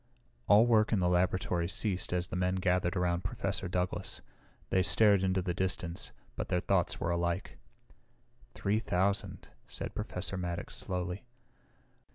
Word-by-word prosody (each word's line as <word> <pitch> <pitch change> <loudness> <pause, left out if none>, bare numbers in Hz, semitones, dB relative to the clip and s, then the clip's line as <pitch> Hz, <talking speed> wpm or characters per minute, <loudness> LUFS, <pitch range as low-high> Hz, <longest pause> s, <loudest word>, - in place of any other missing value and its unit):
All 105 +3 +7
work 110 -2 +4
in 110 - +3
the 90 -2 +2
laboratory 90 0 +1
ceased 95 0 -1
as 90 0 0
the - - -4
men 90 +1 +1
gathered 90 0 +1
around 90 -1 0
Professor 95 -1 -2
Douglas. 90 +1 -2 0.5
They 95 - +4
stared 95 +3 +5
into 95 -1 +1
the 90 -1 -1
distance, 90 -2 -2 0.2
but - - -3
their 90 - +1
thoughts - - +1
were 85 - 0
alike. 85 +2 -2 1.0
"Three 105 +2 +1
thousand," 100 -1 -1 0.2
said - - -5
Professor 95 -2 -4
Maddox 85 -1 -4
slowly. 90 +4 -4
90 Hz, 145 wpm, -32 LUFS, 90-100 Hz, 1.0 s, All